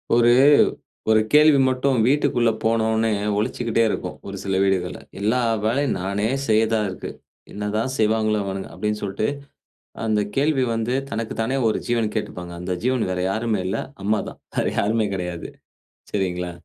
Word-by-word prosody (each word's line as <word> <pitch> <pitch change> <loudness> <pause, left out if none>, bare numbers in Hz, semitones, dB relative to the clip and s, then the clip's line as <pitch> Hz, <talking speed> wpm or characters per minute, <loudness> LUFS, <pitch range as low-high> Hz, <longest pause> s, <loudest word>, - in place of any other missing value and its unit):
ஒரு 120 0 +5 0.8
ஒரு 110 0 +6
கேள்வி 150 -1 +7
மட்டும் 130 0 +1
வீட்டுக்குள்ள 125 -4 +2
போனோன்னே, 110 0 +2 0.3
ஒலிச்சுக்கிட்டே 115 +1 0
இருக்கும், - - -3
ஒரு 100 0 -6
சில 95 -1 -1
வீடுகள்ல, 95 -2 0 0.2
"எல்லா 110 +5 +1 0.3
வேலையும் 135 +5 +1
நானே 100 +3 -1 0.2
செய்யறதா 110 0 +3
இருக்கு. 95 - -6 0.4
என்னதான் 105 +4 -2
செய்வாங்களோ 110 0 +2
அவனுங்க!" 95 0 -4
அப்படினு 105 0 -2
சொல்ட்டு, 100 +2 -1 0.8
அந்த 110 -1 +2 0.2
கேள்வி 140 -1 +2
வந்து, 115 +2 -1 0.2
தனக்கு 115 -2 -3
தானே 120 +4 0
ஒரு - - -1
ஜீவன் 115 -3 0
கேட்டுப்பாங்க, 90 -1 -4
அந்த 90 +1 -3
ஜீவன் 125 -2 +1
வேற 90 - -2
யாரும் 110 +2 0
இல்ல, 95 - -1 0.2
அம்மா 105 +1 +2
தான். - - -14 0.2
வேற - - +1
யாருமே 110 +1 +1
கிடையாது, 90 -2 -4 0.6
சரிங்களா. 90 -3 -2
110 Hz, 145 wpm, -22 LUFS, 100-115 Hz, 0.8 s, கேள்வி